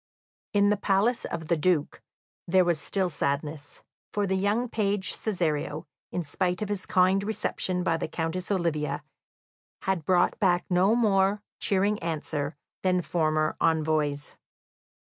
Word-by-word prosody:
In 205 0 +4
the 210 - +2
palace 205 +5 +1
of 160 -2 -5
the 170 - +3
Duke 160 -2 0 0.5
there 185 +1 +4
was 170 -3 +1
still 190 -2 0
sadness, 145 -1 -3 0.3
for 205 -1 0
the 190 - 0
young 205 +6 +1
page 205 -4 -1
Cesario, 160 -6 -2 0.3
in 180 - -2
spite 180 +5 -1
of 210 - -5
his 200 -2 -3
kind 185 +1 +3
reception 185 -3 -1
by 165 -3 +1
the - - -3
Countess 165 +3 -3
Olivia, 150 -6 -1 0.8
had 190 -4 0
brought 180 +7 +2
back 180 -4 +2
no 185 +5 +4
more 205 -3 +2 0.2
cheering 200 +1 +1
answer 155 -2 -3 0.3
than 180 -1 +2
former 155 -2 +1
envoys. 155 -3 +1
180 Hz, 140 wpm, -27 LUFS, 155-195 Hz, 0.8 s, In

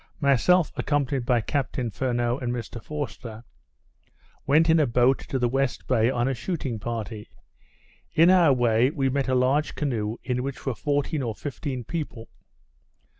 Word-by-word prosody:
Myself, 145 +5 +3
accompanied 140 -4 -1
by 120 -2 +3
Captain 125 -1 -2
Furneaux 120 +2 -1
and 125 -3 -2
Mr 120 -1 -5
Forster, 130 -6 -6 1.0
went 155 +4 +4
in 165 0 +5
a 150 - +3
boat 125 +3 +3
to 135 - -4
the 125 -1 +1
west 135 +1 -1
bay 115 -2 +2
on 120 -1 0
a 135 - +1
shooting 130 - -4
party. 110 -1 -5 0.9
In 165 +3 +6
our 175 -5 +6
way, 120 -1 +3
we 140 -3 0
met 135 +1 -1
a 130 - +1
large 135 +4 +1
canoe 115 -6 -2
in 125 0 -1
which 135 +1 -6
were 135 - 0
fourteen 145 +3 -1
or 115 -4 -3
fifteen 135 0 -5
people. 140 -5 -5
130 Hz, 160 wpm, -25 LUFS, 120-145 Hz, 1.0 s, In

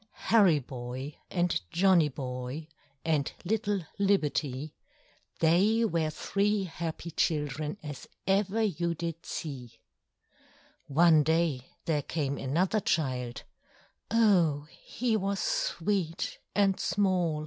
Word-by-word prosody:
Harry 200 -8 +6
Boy 130 +1 -6 0.2
and 175 - +1
Johnny 175 -4 +4
Boy, 130 +2 -5 0.4
And 155 -4 +1
little 205 -2 0
Libbety, 150 -7 0 0.7
They 200 +8 +4
were 165 -6 0
three 200 +5 0
happy 170 -1 -5
children 150 +1 -1
As 145 -3 -7 0.2
ever 200 +3 +2
you 170 -4 0
did 165 0 -5
see: 130 -7 -6 1.1
One 160 +2 +5
day 160 -4 +1 0.2
there 155 -3 +1
came 140 -1 -2
another 175 +10 +1
child; 130 -10 -1 0.7
Oh! 175 -10 +3 0.2
he 240 -2 -1
was 200 -1 -1
sweet 210 - -1 0.2
and 195 -2 +3
small! 185 -5 +1
165 Hz, 105 wpm, -29 LUFS, 145-195 Hz, 1.1 s, Harry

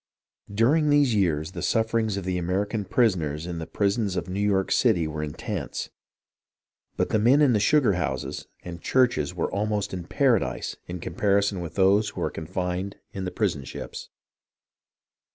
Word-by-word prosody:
During 140 +9 +3
these 145 -4 +4
years 85 -6 +1
the - - -6
sufferings 110 -2 +1
of 100 - -3
the 90 -1 -1
American 100 +4 -1
prisoners 85 - +1
in 85 -1 -4
the 80 - -6
prisons 100 -1 0
of - - -2
New 95 +2 -3
York 100 -2 +1
City 85 -2 +3
were 75 0 -4
intense; 75 -1 -4 1.1
but - - 0
the 110 - +2
men 125 +7 +5
in 145 -5 +5
the 105 - +3
sugar 135 0 +4
houses 90 - -3 0.2
and 85 -1 -8
churches 120 - +2
were - - -1
almost 105 0 -1
in 90 -2 -5
paradise 125 0 +1
in 90 +1 -5
comparison 100 0 +1
with 85 - -7
those 100 +2 +4
who - - -7
were - - -1
confined 90 +4 -3 0.2
in 95 -1 -4
the 90 - -3
prison 85 -10 -1
ships. 65 - -8
100 Hz, 165 wpm, -25 LUFS, 90-110 Hz, 1.1 s, men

